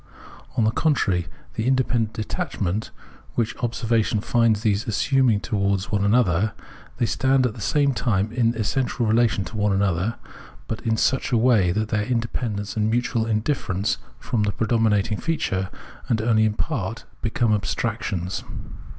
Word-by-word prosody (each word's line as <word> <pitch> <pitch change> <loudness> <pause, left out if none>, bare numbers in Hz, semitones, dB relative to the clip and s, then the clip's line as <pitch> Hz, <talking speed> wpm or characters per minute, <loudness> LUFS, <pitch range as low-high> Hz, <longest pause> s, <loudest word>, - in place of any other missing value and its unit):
On 115 - +3
the 110 - +3
contrary: 100 - +1 0.3
in - - -3
tke - - -1
independent 125 -4 +1
detachment, 105 -1 -2 0.5
which 115 -2 0
observation 115 -2 0
finds 115 -1 +2
these 110 +3 +1
assuming 120 0 +2
towards 100 -2 -1
one 100 -2 +1
another, 105 -2 +3 0.4
they 120 - +1
stand 130 +2 +2
at 120 - 0
the 110 - -10
same 140 +5 +2
time 105 -4 0
in 115 -1 +1
essential 120 +2 0
relation 110 -3 +2
to 95 - -8
one 105 -1 +1
another, 95 +2 +1 0.5
but 110 - -4
in 110 -2 0
such 135 +4 +1
a 120 - +4
way 110 -7 +4
that 110 +3 -1
their 105 -2 +1
independence 115 -3 -2
and 110 0 +1
mutual 115 -1 0
indifierence 105 -3 0 0.2
form 120 -2 -2
the 105 -1 +1
predominating 110 -2 +1
feature, 145 - -1 0.4
and 115 - +2
only 110 -1 +3
in 105 -1 0
part 115 - -3 0.2
become 115 0 +1
abstractions. 100 -3 -2
110 Hz, 150 wpm, -23 LUFS, 105-120 Hz, 0.5 s, a